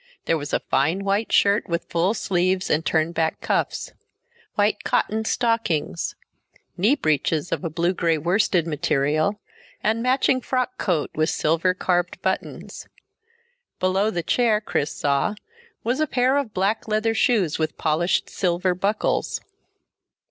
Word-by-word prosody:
There 165 - +2
was 145 0 -6
a - - +1
fine 160 +8 0
white 200 +3 0
shirt 200 -1 +3
with 170 0 -1
full 175 +6 0
sleeves 185 -1 0
and 155 +2 +2
turned 160 +1 +1
back 160 -1 0
cuffs. - - -1 0.6
White 205 +1 +1
cotton 220 +1 0
stockings; 225 - 0 0.6
knee 210 +10 +3
breeches 155 - 0
of - - -2
a 165 - -1
blue 170 +3 0
gray 165 -3 +1
worsted 175 +1 +1
material, 155 +4 0 0.4
and 220 +2 +1
matching 255 +1 +2
frock 255 0 -2
coat 170 -6 0
with 155 +1 +1
silver 165 +4 +1
carved 175 -1 0
buttons. - - -4 0.9
Below 190 +3 +2
the 175 -5 -2
chair, 230 0 +2
Chris 155 -8 -2
saw, 140 +7 0 0.5
was 245 +4 0
a 310 - +2
pair 255 0 +2
of 280 -6 -1
black 200 +4 -1
leather 215 +1 +1
shoes 215 -9 +2
with 155 - -2
polished 165 +3 +1
silver 180 0 0
buckles. 200 +4 -1
185 Hz, 140 wpm, -23 LUFS, 160-215 Hz, 0.9 s, shirt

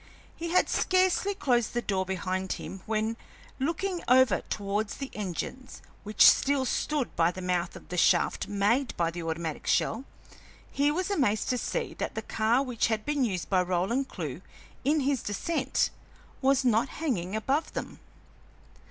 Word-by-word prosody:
He 335 +1 -5
had 360 - +3
scarcely 375 +2 +2
closed 240 - +1
the 240 - +1
door 190 -2 -1
behind 185 0 -2
him 190 - -8
when, 220 +1 -1 0.4
looking 340 +6 -1
over 260 +1 +5
towards 205 +1 -2
the 275 -1 -6
engines 210 +6 -5 0.2
which 210 0 +5
still 275 -1 +4
stood 290 +1 -1
by 165 0 +3
the 180 - -6
mouth 180 -1 -1
of - - -12
the 180 - -4
shaft - - +3
made 210 +6 +1
by 165 -1 +1
the 170 +1 -6
automatic 165 -1 -4
shell, 245 +5 +1 0.7
he 285 +1 +2
was 365 +6 -1
amazed 240 - +1
to 250 - +1
see - - -2
that - - -3
the - - -3
car 225 +4 +1
which 250 -4 0
had 220 -2 -1
been 295 -2 +1
used 190 -7 -1
by 185 -2 +3
Roland 185 +9 0
Clewe - - -5 0.4
in 295 +3 +2
his 270 -2 +1
descent 265 +6 -1 0.5
was 270 0 +3
not 235 +1 +3
hanging 215 - -2
above 270 +8 -1
them. - - -6
235 Hz, 160 wpm, -28 LUFS, 190-275 Hz, 0.7 s, over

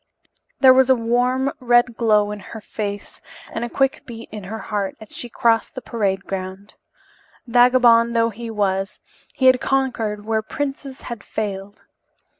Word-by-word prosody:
There 260 -2 +8
was 260 0 +4
a 260 - +6
warm, 250 +3 0
red 240 -1 +3
glow 210 -3 +2
in 210 - -6
her 220 +3 -9
face 205 -1 -6 0.3
and 225 - -4
a 240 - -3
quick 270 +1 0
beat 230 -1 -9
in 210 -3 -8
her 220 +4 -5
heart 205 -3 -3
as 220 -2 -11
she 240 - -4
crossed 230 -1 +1
the 255 - -5
parade 195 -4 -2
ground. 190 +1 -6 0.7
Vagabond 240 -1 +4
though 230 0 +2
he 230 +2 -8
was, 195 -2 -1 0.4
he 260 - 0
had 255 -1 +6
conquered 230 -6 -1
where 220 0 0
princes 275 +2 -5
had 235 -4 -7
failed. 200 -2 -5
230 Hz, 160 wpm, -21 LUFS, 205-250 Hz, 0.7 s, There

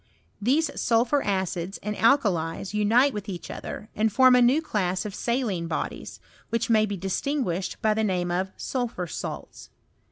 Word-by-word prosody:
These 285 +7 +1
sulphur 245 +5 +2
acids 190 -2 -2
and 210 +1 -3
alkalies 200 - +1
unite 230 +6 +3
with 210 0 -5
each 180 -3 -6
other, 210 - -7
and 220 +1 +1
form 255 +3 +6
a 250 - +5
new 250 +5 +5
class 190 - -1
of 210 - -5
saline 220 -8 -1
bodies, 165 - -4 0.3
which. 230 0 -1
may 215 -1 +4
be 200 -1 -3
distinguished 190 - -2
by 215 -1 +4
the 220 +1 0
name 180 -4 0
of 185 +2 -1
sulphur 240 -8 -3
salts. 170 - -7
210 Hz, 160 wpm, -26 LUFS, 185-245 Hz, 0.3 s, form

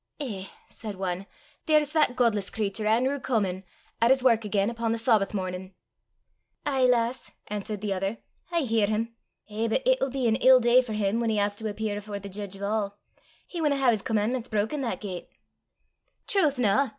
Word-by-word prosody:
"Eh," 210 -10 -4 0.2
said 215 -3 -7
one, 190 0 -3 0.4
"there's 305 -2 +3
that 300 -6 +3
godless 220 -6 +2
cratur, 210 0 -2
An'rew 255 +6 +2
Comin, 195 -8 -1 0.4
at 230 - +5
his 265 -1 +4
wark 230 -3 +4
again 205 +1 0
upo' 230 -1 -2
the 230 - +1
Sawbath 225 -3 +2
mornin'!" 185 0 -4 0.9
"Ay, 270 -3 +2
lass," 240 0 +1 0.2
answered 210 0 -3
the 205 -2 -1
other, 195 +4 -2 0.3
"I 340 -1 +2
hear 225 -6 +2
him! 225 +2 -1 0.3
Eh, 220 +2 -2
but 230 - 0
it'll - - +3
be 260 -2 -1
an 225 0 +3
ill 260 0 +7
day 240 +1 +5
for 240 -4 -6
him 210 +1 0
whan 230 -1 0
he 215 - +1
has 205 0 +1
to 220 0 -3
appear 210 0 -3
afore 205 0 -6
the 200 0 -8
jeedge 195 0 -6
o' 200 - -3
a'! 205 -1 -1 0.5
He 345 - -5
winna 295 -3 +2
hae 265 -3 +4
his 215 -3 -1
comman'ments 225 +4 -1
broken 220 +7 -1
that 245 - -3
gait!" 185 -4 -6 1.0
"Trowth, 340 - +2
na!" 250 +3 +3
220 Hz, 190 wpm, -27 LUFS, 205-255 Hz, 1.0 s, ill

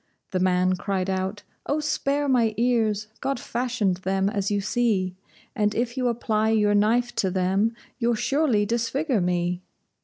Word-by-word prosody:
The 185 - 0
man 185 0 +2
cried 195 0 -1
out: 190 +2 -3 0.2
"Oh, 290 - +1
spare 290 -1 0
my 235 -5 +2
ears! 225 -3 +1
God 275 -2 -2
fashioned 235 -7 -1
them 190 +1 0
as 200 -2 -1
you 205 -1 +1
see, 200 -3 0 0.4
And 210 -3 +1
if 240 +1 -1
you 255 -2 0
apply 220 -2 0
your 210 -2 +3
knife 235 +4 +2
to 190 - +2
them, 190 +5 +1 0.2
you'll 235 -1 +2
surely 240 -2 +1
disfigure 235 - 0
me." 175 0 0
215 Hz, 155 wpm, -25 LUFS, 190-240 Hz, 0.4 s, your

